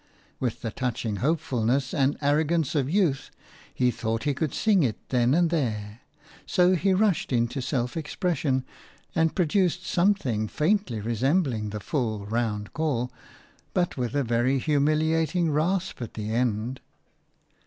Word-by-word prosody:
With 125 -4 -3
the 115 - -2
touching 115 -3 -2
hopefulness 130 - 0
and 135 0 +2
arrogance 155 +1 +1
of 140 -4 0
youth 165 -7 +1 0.4
he 125 -1 +1
thought 115 -1 -2
he 145 -1 +1
could 150 +1 -2
sing 210 -4 +3
it 120 -7 +1
then 125 +1 +3
and 170 -1 +3
there. 110 -8 -2 0.5
So 180 -1 +4
he 190 +2 +2
rushed 190 -5 +2
into 120 +2 0
self 125 -2 -2
expression, 150 -4 -1 0.5
and 165 -1 +1
produced 180 0 +1
something 170 - +1
faintly 155 - 0
resembling 120 - 0
the 105 +1 -5
full, 110 -3 -2
round 105 -1 -2
call, 140 -5 -1 0.6
but 175 -1 +1
with 125 0 -3
a 140 - +2
very 120 +3 +1
humiliating 155 +4 +1
rasp 175 +3 0
at 115 - -6
the 110 0 -4
end. 120 +1 -1
135 Hz, 140 wpm, -26 LUFS, 120-165 Hz, 0.6 s, So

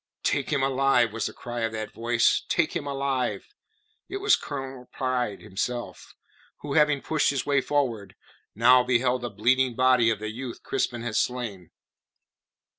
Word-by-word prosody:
"Take 140 - 0
him 140 -3 +1
alive!" 135 -4 +2
was 115 - -2
the - - -6
cry 120 0 -6
of 115 -1 -1
that 110 -1 -5
voice. 115 0 +2
"Take - - +1
him - - -3
alive!" 140 - -2 0.6
It 395 - -3
was 410 +1 +4
Colonel 135 -3 -7
Pride 125 -5 -2
himself, 120 +5 -5 0.5
who 145 -1 -4
having 150 -2 +3
pushed 155 -2 +1
his 140 -3 -1
way 140 -1 +2
forward, 125 -8 -1 0.4
now 125 +3 +6
beheld 125 0 +1
the 120 - -3
bleeding 120 +4 +1
body 130 -2 +4
of 115 - 0
the 110 +1 -5
youth 125 +1 -7
Crispin 120 -1 -2
had 115 -2 -2
slain. 110 -9 -2
125 Hz, 160 wpm, -26 LUFS, 115-135 Hz, 0.6 s, now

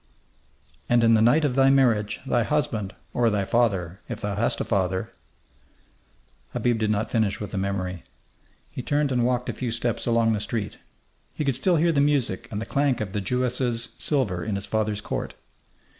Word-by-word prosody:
"And 120 -1 +4
in 115 0 +5
the 110 - +4
night 140 +8 +4
of 140 - +1
thy 135 +1 +5
marriage 120 -6 +2
thy 120 -2 +2
husband, 115 -7 -1 0.2
or 120 -1 +3
thy 105 -2 0
father, 95 -6 0
if 120 -4 -4
thou 105 -1 -3
hast 110 +4 0
a - - 0
father 95 -3 -1 0.7
" - - -36
Habib 120 -2 +1
did 110 -1 0
not 105 0 -1
finish 110 -4 +1
with 105 - -6
the 100 - -2
memory. 95 -2 -2 0.7
He - - -5
turned 145 +2 0
and 125 -2 +2
walked 125 0 0
a - - -2
few 125 - -3
steps 115 0 -2
along 115 -1 +3
the 105 - -1
street. 105 0 -3 0.6
He 150 - -2
could 135 -3 +1
still 175 +8 +2
hear 165 +1 +3
the 140 -3 +2
music 140 -9 +1
and 105 - -4
the 110 - -4
clank 140 -2 +1
of 100 -3 -4
the 105 - -1
Jewess's 125 +2 -1
silver 105 - 0
in 110 -2 -2
his 100 - -3
father's 110 -1 -1
court.... - - -4
115 Hz, 195 wpm, -25 LUFS, 105-125 Hz, 0.7 s, in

